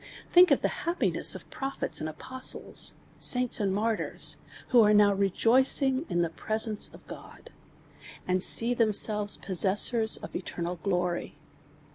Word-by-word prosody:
Think 360 0 +5
of - - +1
t!ie - - 0
happiness 340 +2 +1
of - - -11
prophets 270 0 -2
and 155 - -4
apostles, 260 +11 -6 0.2
saints 250 -1 +3
and 200 -2 -1
martyrs, 215 +3 -1 0.3
wlio 240 -3 +5
are - - +4
now 205 -1 +4
rejoicing 260 - +1
in 175 - -1
the 170 - -1
pre 215 +6 -4
.sence 220 -2 -1
of - - -17
God, - - -13 0.8
and 185 0 0
see 230 +5 +3
themselves 210 -2 +2
possessors 205 +4 +2
of - - -10
eter 175 -1 -6
nal 175 +1 -4
glory. 180 -1 -3
215 Hz, 145 wpm, -27 LUFS, 190-250 Hz, 0.8 s, Think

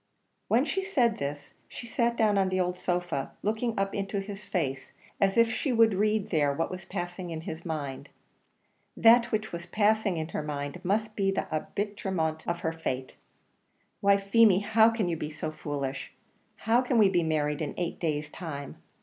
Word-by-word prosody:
When 245 +5 +3
she 385 - -1
said 250 - +1
this, 145 +1 -5 0.2
she - - -8
sat 235 0 0
down 215 -2 +3
on 190 -1 +2
the 185 0 0
old 180 0 0
sofa, 175 -6 -2
looking 220 +2 -1
up 195 0 0
into 200 0 -2
his 195 0 -7
face, 135 -7 -2 0.3
as 195 0 +2
if 230 0 +5
she 275 - -1
would 225 -2 +5
read 210 +1 +1
there 150 -4 +3
what 165 +4 -2
was 185 -1 -7
passing 175 -1 -5
in 160 -1 -5
his 160 0 -6
mind. 140 -3 -4 0.9
That 235 +1 +6
which 215 -1 -1
was 170 0 -6
passing 210 -1 +2
in 160 0 -3
his 155 - -3
mind 145 +3 -5
must 215 +3 0
be 195 -1 +1
the 195 - -1
arbitrament 165 -2 -2
of 170 0 -2
her 160 -1 -1
fate. 130 -5 -4 0.8
"Why, 200 0 +5
Feemy, 200 0 +4
how 220 +2 +5
can 225 -4 -1
you 170 -1 -1
be 150 - -4
so 155 +1 -5
foolish? 140 -3 -4 0.4
How 230 +3 +2
can 250 -1 0
we 210 -3 +7
be 180 -2 +2
married 150 -2 0
in 150 - -3
eight 175 -1 -3
days' 155 -3 -2
time? 145 -6 -7
185 Hz, 185 wpm, -28 LUFS, 155-215 Hz, 0.9 s, we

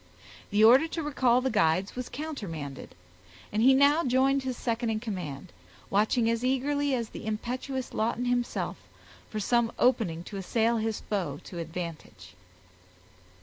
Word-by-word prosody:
The 210 +1 +3
order 255 +8 +7
to 325 0 -4
recall 255 -4 +2
the 260 0 0
guides 190 -2 +1
was 250 0 -5
countermanded, 185 - -6 0.6
and 215 - 0
he 265 +3 +6
now 285 +4 +5
joined 265 +2 +2
his 260 -2 -4
second 235 0 -1
in 220 -1 0
command, 180 - -6 0.4
watching 220 +4 +2
as 230 +1 0
eagerly 275 +2 +1
as 230 -3 -3
the 220 - -8
impetuous 250 +4 -3
Lawton 230 +3 -1
himself, 245 -1 -1 0.5
for 215 - -4
some 235 +2 +2
opening 200 -10 +2
to 200 - -8
assail 225 +4 +1
his 220 -1 -2
foe 175 -9 -3
to 175 - -8
advantage. 165 - -7
230 Hz, 145 wpm, -28 LUFS, 200-260 Hz, 0.6 s, order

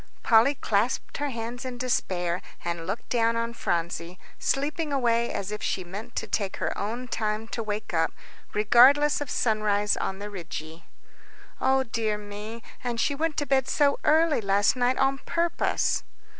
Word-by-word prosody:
Polly 235 +5 +5
clasped 225 -2 0
her 290 0 -1
hands 235 0 -5
in 255 -1 -5
despair, 180 -8 -1 0.2
and 170 -1 -3
looked 195 +4 -4
down 230 -1 +2
on 230 0 -1
Phronsie, 170 -3 -2 0.2
sleeping 295 +3 -1
away 235 -3 +2
as 200 +1 -3
if 210 - -4
she 185 - -1
meant 195 +5 -8
to - - -2
take 200 -3 -2
her - - -2
own 235 +5 -3
time 215 -1 -2
to 230 - -3
wake 210 -1 -4
up, 165 -1 +2 0.4
regardless 260 +8 +5
of 290 - -4
sunrise 210 -2 +1
on 190 - -3
the 205 +1 -7
Rigi. 165 -3 -7 0.8
"O 265 0 +3
dear 225 -3 -1
me, 210 +2 -8 0.2
and 240 -2 -2
she 285 - +2
went 310 +1 -1
to 290 - 0
bed 265 -2 +2
so 285 -2 +2
early 315 -3 +4
last 200 +2 +3
night 250 0 +1
on 270 0 +2
purpose." 335 +3 0
230 Hz, 165 wpm, -27 LUFS, 205-265 Hz, 0.8 s, Polly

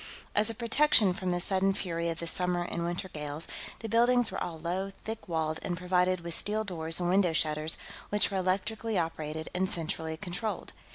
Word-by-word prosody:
As 210 +1 +3
a 230 - -3
protection 235 -3 +4
from 185 0 -3
the 175 0 +1
sudden 195 +2 +2
fury 170 -3 -2
of 165 - -2
the 170 - -4
summer 180 +1 +1
and 170 -1 -3
winter 175 +2 -2
gales, 150 -1 -4 0.3
the 225 - -3
buildings 240 +1 +4
were - - -2
all 170 -2 -4
low, 180 +4 -2
thick 220 0 -5
walled, 160 -2 -1
and 175 - -2
provided 180 0 +2
with 170 0 -4
steel 215 +5 +1
doors 165 -5 -2
and 175 - 0
window 180 -2 +4
shutters 155 0 +1 0.3
which 210 0 +3
were 195 - 0
electrically 200 +4 0
operated 160 -2 -2
and 185 +1 +1
centrally 160 -2 -3
controlled. 185 +5 -4
180 Hz, 190 wpm, -30 LUFS, 165-200 Hz, 0.3 s, protection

